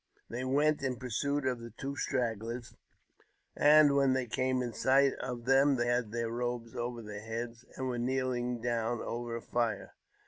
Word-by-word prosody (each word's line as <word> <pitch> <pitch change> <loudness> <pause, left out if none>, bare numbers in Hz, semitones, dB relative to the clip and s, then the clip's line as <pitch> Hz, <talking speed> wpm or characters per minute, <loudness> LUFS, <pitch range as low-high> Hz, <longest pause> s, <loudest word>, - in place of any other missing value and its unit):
They 120 +2 -3
went 145 +4 +2
in 130 -2 -1
" - - -15
pursuit 135 +3 -1
of 125 -2 0
the 115 0 -8
two 140 +4 -6
stragglers, 115 -2 -2 0.8
and 150 -1 +6
when 135 -2 +4
they 130 -1 0
came 130 +2 0
in 120 -2 -4
sight 135 +4 +4
of 125 -2 -5
them 135 +2 +5
they 120 -1 0
had 120 -2 0
their 115 0 -2
robes 120 -1 -3
over 120 -1 -3
their 105 -1 -7
heads, 115 +2 -5
and 130 - -3
were 125 -1 -2
kneeling 125 -1 -1
down 120 -1 -1
over 120 0 -4
a 115 - -6
fire. 115 -4 -1
120 Hz, 180 wpm, -32 LUFS, 115-130 Hz, 0.8 s, and